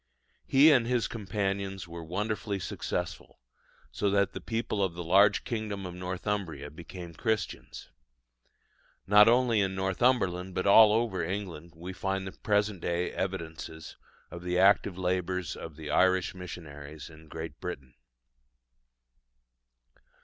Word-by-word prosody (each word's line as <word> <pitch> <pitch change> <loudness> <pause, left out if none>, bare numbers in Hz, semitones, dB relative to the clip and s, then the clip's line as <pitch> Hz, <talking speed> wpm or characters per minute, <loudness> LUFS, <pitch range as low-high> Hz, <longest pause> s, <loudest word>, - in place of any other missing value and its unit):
He 145 +4 +7
and 125 -5 +4
his 125 -1 +1
companions 100 -3 -3
were 85 0 -8
wonderfully 105 +4 -2
successful, 90 - -4 0.5
so 100 - 0
that 100 0 +2
the 95 - -6
people 115 -1 -1
of 90 -3 -1
the 85 - -5
large 100 +4 +5
kingdom 105 -4 -4
of 90 - -6
Northumbria 90 -5 -4
became 85 +2 -9
Christians. 110 -2 -3 1.1
Not 105 +2 +7
only 120 -2 +4
in 95 -1 -1
Northumberland 95 -2 +1
but 95 - -1
all 105 +2 +8
over 110 -5 +1
England 85 -3 -5
we 90 +3 -7
find 95 +1 -2
at 95 - -7
the - - -26
present 105 -3 +1
day 85 +1 -1
evidences 80 -4 -5 0.4
of 85 - -7
the 90 0 -1
active 95 0 +4
labours 90 0 -1
of 80 -2 -8
the 75 -1 -6
Irish 95 +1 +3
missionaries 75 -5 -9
in 80 0 -15
Great 80 -1 -7
Britain. 65 -2 -6
95 Hz, 135 wpm, -29 LUFS, 85-105 Hz, 1.1 s, all